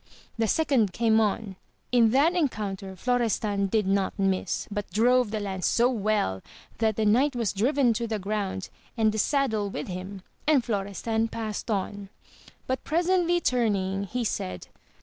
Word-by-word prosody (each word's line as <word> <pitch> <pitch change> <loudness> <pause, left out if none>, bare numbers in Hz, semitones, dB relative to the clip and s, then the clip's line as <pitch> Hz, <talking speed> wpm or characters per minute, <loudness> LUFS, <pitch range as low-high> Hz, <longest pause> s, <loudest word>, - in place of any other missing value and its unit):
The 225 -1 0
second 245 - +2
came 225 0 +3
on, 210 -2 -1 0.3
in 235 -2 +5
th'at 285 +8 +3
encounter 200 - -2
Florestan 215 -3 0
did 215 +1 +1
not 195 0 0
miss, 195 -2 0
but 205 -1 -4
drove 240 +4 +3
the 215 0 -2
lance 190 -4 -2
so 245 +2 +3
well 210 - 0 0.4
that 220 -2 +2
the 220 - 0
knight 255 +6 +3
was 230 -4 -1
driven 245 +4 +2
to 235 +1 -2
the 220 -1 -2
ground 200 -1 -3 0.3
and 220 -1 +3
the 215 - -3
saddle 220 -6 +1
with 150 -6 -5
him, 185 +1 -6 0.2
and 285 -6 +4
Florestan 220 +1 -1
passed 225 0 -5
on. 200 -1 -3 0.6
But 260 0 -2
presently 350 +1 +2
turning 200 - 0
he 245 +5 -3
said. 90 - -4
215 Hz, 155 wpm, -26 LUFS, 195-245 Hz, 0.6 s, in